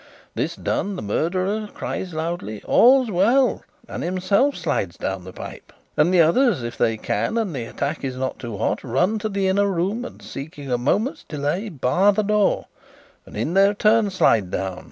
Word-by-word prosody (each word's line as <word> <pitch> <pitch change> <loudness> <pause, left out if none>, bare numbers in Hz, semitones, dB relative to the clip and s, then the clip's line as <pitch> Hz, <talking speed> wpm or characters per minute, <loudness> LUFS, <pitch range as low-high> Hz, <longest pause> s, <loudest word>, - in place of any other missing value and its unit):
This - - -2
done, 200 0 -2
the - - -5
murderer 185 - -1
cries 185 - -4
loudly, 160 -10 -4
'All's 255 -1 +5
well!' 230 +7 +3 0.3
and - - -6
himself 195 +10 +1
slides 145 - -2
down 95 -2 -4
the 95 - -8
pipe; - - -10 0.2
and 150 +4 +3
the 180 -2 +5
others, 190 - +3
if 120 0 -5
they 115 0 +1
can 225 - -1
and 215 -7 -1
the 120 -3 -3
attack 140 +6 -4
is 130 -2 -3
not 130 0 -3
too 115 -5 -6
hot, - - -1
run 180 - +1
to 215 +1 -2
the 195 -1 0
inner 200 +2 +2
room 195 +5 -1
and, - - -9
seeking 145 -2 -8
a 125 - +2
moment's 220 - 0
delay, 150 +8 -2
bar 180 +6 +2
the 215 +2 +1
door, 210 0 +2 0.6
and - - -10
in 130 +10 -1
their 195 +2 +4
turn 215 0 +3
slide 115 - +2
down. 95 -1 -3
180 Hz, 185 wpm, -22 LUFS, 130-205 Hz, 0.6 s, All's